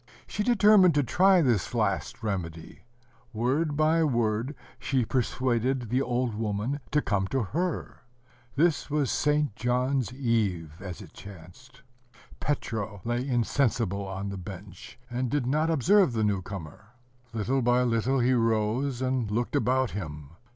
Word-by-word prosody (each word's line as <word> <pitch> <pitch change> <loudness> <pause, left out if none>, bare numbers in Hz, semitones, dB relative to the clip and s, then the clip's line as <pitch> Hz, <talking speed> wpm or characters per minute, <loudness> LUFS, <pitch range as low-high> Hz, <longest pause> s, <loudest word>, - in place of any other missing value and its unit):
She 210 - -4
determined 205 -6 +5
to 145 - +3
try 185 +7 +4
this 120 -3 0
last 110 +1 -1
remedy: 85 -4 -5 0.5
word 140 +7 0
by 160 +1 +3
word 120 -1 0 0.2
she 130 -4 0
persuaded 125 0 0
the 130 +2 +2
old 125 -2 -1
woman 110 +5 -2
to 150 0 +1
come 95 -2 0
to 130 +3 0
her. 165 - -3 0.6
This 160 +2 +2
was 145 -3 0
St. 150 -6 +1
John's 125 +2 0
Eve, 110 - -1
as 95 -3 -7
it - - -15
chanced. 100 +8 -13 0.6
Petro 110 -8 -3
lay 120 +3 -1
insensible 115 -5 0
on 95 +1 -4
the 100 - -5
bench, 95 +1 -10
and 125 0 -2
did 145 -2 0
not 155 +5 +1
observe 170 - +4
the 110 -1 0
new 100 -3 +1
comer. 95 +3 -9 0.4
Little 115 +4 0
by 125 +1 +3
little 125 +2 +1
he 125 +2 +3
rose, 115 +3 0
and 130 -4 0
looked 115 +3 -1
about 130 +2 +1
him. 75 -7 -7
120 Hz, 145 wpm, -27 LUFS, 105-135 Hz, 0.6 s, determined